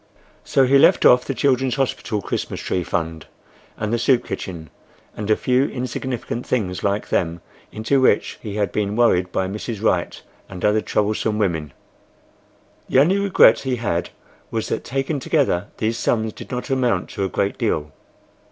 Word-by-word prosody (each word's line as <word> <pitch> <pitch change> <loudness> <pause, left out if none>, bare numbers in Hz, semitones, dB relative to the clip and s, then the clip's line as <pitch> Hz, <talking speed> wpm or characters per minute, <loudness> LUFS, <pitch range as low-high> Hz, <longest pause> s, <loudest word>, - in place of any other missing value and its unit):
So 135 - +3
he 135 +2 +5
left 165 +5 +5
off 125 0 +6
the 135 - -3
Children's 130 -2 +1
Hospital 120 -6 -2
Christmas - - -3
tree 90 - -2
Fund, 80 -2 -3 0.5
and 110 +1 -2
the 120 - +1
soup 125 +1 +2
kitchen, 85 -5 -6 0.4
and 105 0 -5
a 110 - +5
few 125 +4 +2
insignificant 125 -2 -4
things 95 -8 -2
like 100 +1 -1
them 85 -1 0 0.3
into 110 +5 +1
which 115 -5 +2
he 105 -2 -6
had 100 -4 0
been 105 -1 -1
worried 90 -6 +3
by 95 - -1
Mrs. 105 +2 -5
Wright 90 -5 0 0.3
and 90 -2 -5
other 105 +1 +3
troublesome 105 +1 0
women. 80 -8 -1 1.2
The - - +2
only 175 +9 +4
regret 185 - +5
he 130 -2 -2
had 90 -8 -2 0.4
was 110 -1 -3
that - - -2
taken 135 +3 -2
together 125 - +1
these 115 +1 -1
sums 110 -2 0
did - - -11
not 125 +2 -4
amount 125 -8 0
to 100 - -3
a 95 - -1
great 100 +2 -1
deal. 75 -1 -1
110 Hz, 170 wpm, -21 LUFS, 95-130 Hz, 1.2 s, off